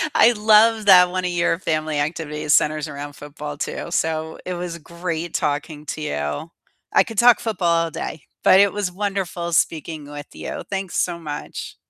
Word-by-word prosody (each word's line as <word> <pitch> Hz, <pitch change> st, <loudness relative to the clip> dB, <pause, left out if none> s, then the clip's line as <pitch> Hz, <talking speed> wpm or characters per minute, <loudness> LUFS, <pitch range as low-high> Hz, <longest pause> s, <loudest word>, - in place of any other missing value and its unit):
I 240 Hz, -, +7 dB
love 220 Hz, +1 st, +4 dB
that 180 Hz, -2 st, +8 dB
one 185 Hz, 0 st, -2 dB
of 180 Hz, -, -1 dB
your 170 Hz, -1 st, +1 dB
family 155 Hz, -3 st, -1 dB
activities 150 Hz, -1 st, -1 dB
centers 155 Hz, 0 st, +2 dB
around 145 Hz, 0 st, -7 dB
football 145 Hz, 0 st, -8 dB
too. -, -, -4 dB
So 160 Hz, -1 st, -1 dB
it 180 Hz, -, -3 dB
was 175 Hz, -1 st, -5 dB
great 170 Hz, 0 st, -5 dB
talking 150 Hz, +1 st, -2 dB
to 155 Hz, -, -4 dB
you. 75 Hz, -, -3 dB, 0.4 s
I -, -, +6 dB
could 225 Hz, -4 st, -9 dB
talk 240 Hz, +1 st, +6 dB
football 170 Hz, -6 st, +1 dB
all 165 Hz, -, -6 dB
day, 155 Hz, -, -6 dB, 0.2 s
but 190 Hz, -, +7 dB
it 200 Hz, -1 st, +5 dB
was 205 Hz, -3 st, -2 dB
wonderful 190 Hz, -3 st, -3 dB
speaking 155 Hz, -2 st, -1 dB
with 145 Hz, 0 st, -8 dB
you, -, -, -6 dB
thanks 195 Hz, -2 st, -4 dB
so 175 Hz, -1 st, 0 dB
much. 150 Hz, -3 st, -7 dB
170 Hz, 175 wpm, -22 LUFS, 150-185 Hz, 0.4 s, that